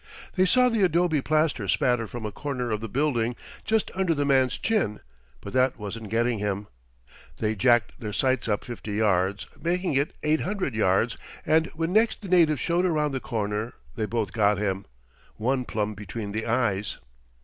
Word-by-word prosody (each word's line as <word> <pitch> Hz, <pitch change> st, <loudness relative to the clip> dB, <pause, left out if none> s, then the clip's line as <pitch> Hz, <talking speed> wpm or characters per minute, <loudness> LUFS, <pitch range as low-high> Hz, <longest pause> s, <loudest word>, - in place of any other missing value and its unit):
They 185 Hz, 0 st, +3 dB
saw 250 Hz, +5 st, +5 dB
the 230 Hz, -3 st, +1 dB
adobe 175 Hz, -4 st, +3 dB
plaster 155 Hz, -8 st, +1 dB
spatter 120 Hz, +3 st, +2 dB
from 120 Hz, +1 st, -6 dB
a 105 Hz, -, -3 dB
corner 125 Hz, -2 st, -3 dB
of 105 Hz, 0 st, -1 dB
the 115 Hz, -, -5 dB
building 125 Hz, -3 st, 0 dB, 0.3 s
just 220 Hz, -1 st, +1 dB
under 185 Hz, -3 st, +1 dB
the 145 Hz, 0 st, 0 dB
man's 130 Hz, -2 st, +3 dB
chin; 210 Hz, -, 0 dB, 0.4 s
but 100 Hz, -, -8 dB
that 130 Hz, 0 st, +2 dB
wasn't 105 Hz, 0 st, -6 dB
getting 115 Hz, +1 st, +1 dB
him. 100 Hz, 0 st, -2 dB, 0.7 s
They 110 Hz, 0 st, 0 dB
jacked 120 Hz, +1 st, +2 dB
their 105 Hz, -4 st, -4 dB
sights 130 Hz, +4 st, +1 dB
up 105 Hz, -2 st, 0 dB
50 115 Hz, -3 st, -6 dB
yards, 100 Hz, -2 st, +1 dB, 0.2 s
making 180 Hz, 0 st, 0 dB
it 140 Hz, +2 st, 0 dB
800 160 Hz, -, 0 dB
yards; 110 Hz, +2 st, +2 dB, 0.3 s
and 160 Hz, +1 st, +3 dB
when 165 Hz, +2 st, -1 dB
next 220 Hz, +2 st, +3 dB
the 200 Hz, -, -7 dB
native 165 Hz, -6 st, +4 dB
showed 175 Hz, +1 st, +1 dB
around 150 Hz, -3 st, +1 dB
the 135 Hz, -, -2 dB
corner 105 Hz, -1 st, -3 dB, 0.2 s
they 110 Hz, -, -2 dB
both 110 Hz, -3 st, -2 dB
got 105 Hz, -2 st, +3 dB
him 95 Hz, -1 st, -2 dB, 0.5 s
one 125 Hz, +3 st, 0 dB
plumb 105 Hz, -1 st, -2 dB
between 105 Hz, +1 st, -6 dB
the 110 Hz, +2 st, -3 dB
eyes. 105 Hz, -4 st, 0 dB
120 Hz, 175 wpm, -26 LUFS, 105-155 Hz, 0.7 s, saw